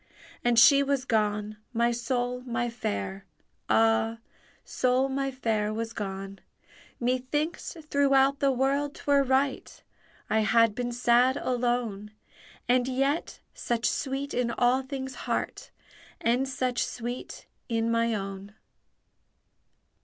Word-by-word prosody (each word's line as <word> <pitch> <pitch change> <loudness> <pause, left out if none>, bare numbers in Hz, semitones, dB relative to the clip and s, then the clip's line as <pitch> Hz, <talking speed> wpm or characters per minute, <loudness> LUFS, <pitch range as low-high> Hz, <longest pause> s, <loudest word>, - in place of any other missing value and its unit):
And 240 -1 +2
she 280 +4 +8
was 275 -2 0
gone, 210 -2 0 0.2
my 235 +1 +2
sole, 245 +1 -2
my 240 -1 -2
Fair, 100 - -4 0.4
Ah, 110 - +3 0.5
sole 255 +1 +1
my 275 0 -1
Fair, 220 -5 -1
was 225 +1 -4
gone! 195 -1 -5 0.6
Methinks, 260 +8 -2
throughout 275 -1 +3
the 275 -1 +3
world 275 +3 0
'twere 285 -1 +2
right 265 +1 -1 0.4
I 220 - +2
had 220 +1 +4
been 245 +2 -3
sad 245 +2 +3
alone; 240 -5 -1 0.6
And 250 0 +3
yet, 275 +5 -1
such 235 0 -2
sweet 275 +1 -2
in 245 -1 0
all 245 +2 +2
things' 265 0 -6 0.2
heart, - - -2 0.5
And 250 +3 +1
such 255 -2 -1
sweet 245 +1 -6 0.2
in 230 0 0
my 230 0 +1
own! 195 0 -6
245 Hz, 115 wpm, -27 LUFS, 225-265 Hz, 0.6 s, she